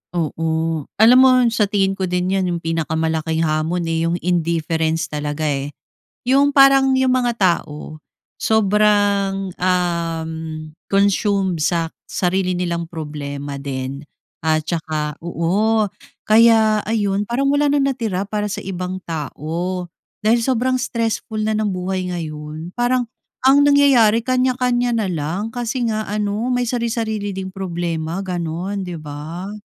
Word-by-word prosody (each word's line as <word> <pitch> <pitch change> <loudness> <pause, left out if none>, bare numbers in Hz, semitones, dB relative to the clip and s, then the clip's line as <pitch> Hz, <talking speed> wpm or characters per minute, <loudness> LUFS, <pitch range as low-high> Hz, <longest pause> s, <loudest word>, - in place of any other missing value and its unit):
Oo. 160 -1 -1
Alam 230 +4 +7
mo 260 0 +7 0.2
sa 215 -3 +2
tingin 195 -1 +1
ko 190 -1 -2
din 180 +1 -1
'yan 190 -1 +1
'yong 170 -1 -3
pinakamalaking 160 0 -1
hamon 160 +3 0
eh, 165 0 0
'yong 170 - 0
indifference 165 -2 0
talaga 150 +1 -3
eh. 145 -1 -2 0.5
'Yong 280 +2 +4
parang 275 -1 +6
'yong 260 0 +2
mga 245 -2 +1
tao 155 -4 -1 0.4
sobrang, 205 -2 +2
um, 170 -3 0 0.6
consumed 195 -2 +2
sa 165 +1 0 0.2
sarili 185 0 0
nilang 170 -2 -2
problema 145 -3 -6
din 135 0 -4 0.4
at 155 0 +1
tsaka 155 -2 -3
oo 195 +7 +1 0.4
kaya 220 -1 +5
ayon 205 -2 0
parang 275 +4 +1
wala 290 +1 +2
ng 285 -1 +2
natira 215 -7 -2
para 210 +1 -2
sa 195 - -5
ibang 185 0 -5
tao 170 +4 -4 0.4
dahil 225 +2 +4
sobrang 255 +1 +1
stressful 225 -3 -2
na 220 - 0
ng 215 0 0
buhay 185 0 -3
ngayon. 155 0 -6
Parang 245 0 +1 0.4
ang 270 +2 +6
nangyayari, 275 -6 +5
kanya-kanya 250 -1 +1
na 215 -4 0
lang 165 +7 -2
kasi 245 +1 -2
nga 215 -1 -1
ano 210 +3 -1
may 245 0 +1
sari-sarili 225 -4 -2
ding 190 0 -5
problema 170 -2 -3
gano'n, 180 +2 -3
'di 175 - -5
ba. 155 +6 -7
185 Hz, 130 wpm, -20 LUFS, 165-220 Hz, 0.6 s, Alam